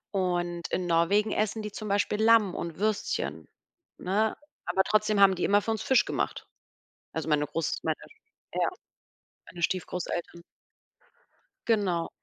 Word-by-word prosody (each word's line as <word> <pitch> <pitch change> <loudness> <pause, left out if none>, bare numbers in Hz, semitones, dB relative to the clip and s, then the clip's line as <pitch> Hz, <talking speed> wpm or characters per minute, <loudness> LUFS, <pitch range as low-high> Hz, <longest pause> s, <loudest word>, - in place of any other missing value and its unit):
Und 175 -2 -1
in 180 - -1
Norwegen 175 +6 +2
essen 215 +1 -1
die 210 - -5
zum 215 0 -6
Beispiel 205 +1 +1
Lamm 220 -4 +5
und 170 -2 -5
Würstchen, 210 +1 -2 0.5
ne? 210 +4 0 0.3
Aber 190 - +2
trotzdem 215 0 +2
haben 195 -1 +7
die 180 - -3
immer 205 +1 +4
für 225 - -1
uns 220 -1 -2
Fisch 265 - +3
gemacht. - - -3 0.7
Also, 160 -1 -4
meine 150 -1 +2
groß 165 0 -2
meine, - - 0 0.6
ja - - +2 0.8
meine 170 - -10
Stiefgroßeltern. 175 -1 -2 1.3
Genau. 190 -7 +1
195 Hz, 135 wpm, -28 LUFS, 175-215 Hz, 1.3 s, haben